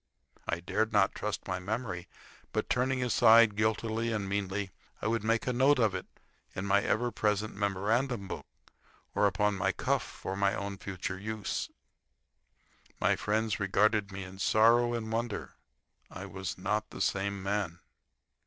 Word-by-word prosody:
I 85 - -1
dared 110 +5 0
not 105 -2 +3
trust 105 - -4
my 95 -1 -2
memory; 100 -2 -4 0.5
but, - - -1
turning 130 0 +1
aside 115 -2 +6
guiltily 110 +2 0
and 105 -3 -2
meanly, 100 0 -2 0.3
I - - -7
would 110 -1 +1
make 115 0 +1
a 125 - 0
note 135 +4 +4
of 110 -5 +3
it 95 - -4 0.5
in 95 - -3
my 100 0 +4
ever 120 +4 0
present 105 0 0
memorandum 100 +3 0
book - - -6 0.7
or 105 - +4
upon 105 +1 +1
my 95 0 +1
cuff - - 0
for 95 - -6
my 100 0 +2
own 100 -1 -4
future 95 0 -4
use. 110 0 -3 1.3
My - - +3
friends 110 0 0
regarded 100 +1 +2
me 95 0 -5
in 95 +1 -10
sorrow 120 +4 +4
and 110 -1 -4
wonder. 115 -1 -3 0.6
I - - -7
was 95 -1 -5
not 105 +4 -1
the - - -9
same 100 0 0
man. 100 -4 -1
105 Hz, 155 wpm, -31 LUFS, 95-110 Hz, 1.3 s, aside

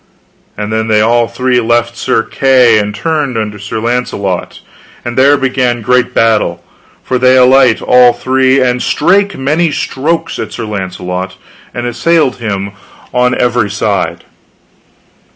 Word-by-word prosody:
And 105 +1 -4
then 110 0 -1
they 110 -1 +2
all 115 +2 +2
three 125 +1 0
left 120 0 0
Sir 115 - 0
Kay, 125 -5 +3
and 105 0 -3
turned 150 -1 -2
unto 105 -1 -4
Sir 105 +3 -6
Launcelot, 110 -6 -3 0.5
and 120 0 -4
there 140 +2 +4
began 130 -3 -1
great 125 +1 +1
battle, 105 -7 +1 0.4
for 125 - -1
they 130 +1 +4
alight 130 -2 +4
all 125 -1 +5
three, 130 +2 +1
and 125 -1 0
strake 195 +5 +1
many 155 +5 0
strokes 165 +5 -2
at 110 - -5
Sir 115 - -5
Launcelot, 95 -2 -5 0.4
and 120 - -5
assailed 140 +4 +1
him 100 -4 -4 0.4
on 125 0 +1
every 120 -3 +1
side. 100 -5 -2
120 Hz, 140 wpm, -11 LUFS, 105-130 Hz, 0.5 s, all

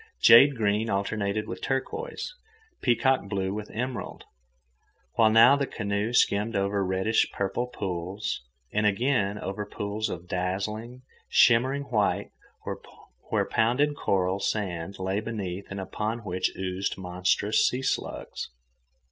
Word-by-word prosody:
Jade 135 +5 +8
green 110 0 +1
alternated 100 +1 -1
with - - -6
turquoise, 450 - -3 0.5
peacock 125 -3 +2
blue 95 -1 -1
with 105 0 -5
emerald, 125 +2 -5 0.9
while 115 -2 +5
now 115 +5 +7
the 140 -1 -1
canoe 100 +1 -2
skimmed 110 -2 +2
over 100 0 +1
reddish 95 +4 +1
purple 100 +5 -2
pools, 95 -3 -4 0.3
and 105 0 +2
again 105 -1 +1
over 100 +1 -4
pools 105 +1 -3
of 90 0 -6
dazzling, 105 +8 -3 0.3
shimmering 130 +4 +4
white 110 -7 0 1.0
where - - +2
pounded 135 +6 +2
coral 95 -5 0
sand 95 -4 -2
lay 95 +2 -1
beneath 100 -4 -5
and 100 - -5
upon 110 +4 -3
which 90 -2 -1
oozed 95 +1 -2
monstrous 90 +3 +1
sea 130 +1 -2
slugs. - - -3
105 Hz, 120 wpm, -27 LUFS, 95-115 Hz, 1.0 s, Jade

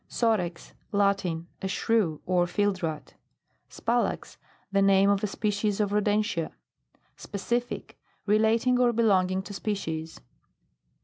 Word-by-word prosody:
SOREX. 185 -8 -1 0.2
Latin. 195 -5 +1 0.2
A 190 - -2
Shrew, 190 -5 0
or 175 -1 +2
fieldrat. 180 -5 -2 0.6
SPALAX. 235 +1 -1 0.3
The 195 0 +3
name 195 0 +5
of 200 0 0
a - - +2
species 205 0 -1
of 205 -2 +1
rodentia. 210 -4 0 0.6
SPECIFIC. 240 +4 -4 0.3
Relating 225 +4 +3
or 245 -1 +4
belonging 190 -4 +2
to 205 - -8
species. 165 -6 -4
200 Hz, 110 wpm, -27 LUFS, 185-215 Hz, 0.6 s, name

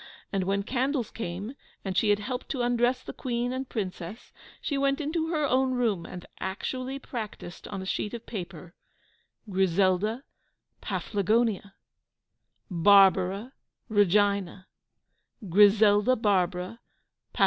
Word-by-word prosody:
And 195 -2 0
when 200 +1 0
candles 260 +1 -1
came, 205 +2 -5 0.3
and 190 -1 -3
she 210 - +3
had 205 - +4
helped 250 +4 -5
to 255 -3 -1
undress 245 +1 +1
the - - -7
Queen 245 0 -2
and 260 0 -4
Princess, 190 -1 -5 0.3
she 290 - -2
went 275 +1 +1
into 320 +2 -1
her 310 -3 0
own 260 -1 +2
room, 220 -9 0
and 180 -1 -9
actually 255 +7 -4
practiced, 215 -10 -7
on 195 -2 -5
a - - -7
sheet 210 +3 -2
of 235 - -9
paper, 180 -4 -7 0.7
"Griselda 190 +4 +1 0.6
Paflagonia," 205 -1 0 1.0
"Barbara 195 +5 +4 0.4
Regina," 200 -2 +2 0.8
"Griselda 205 +5 +5
Barbara, 185 -1 0 0.5
Paf. - - -10
210 Hz, 120 wpm, -27 LUFS, 190-250 Hz, 1.0 s, Griselda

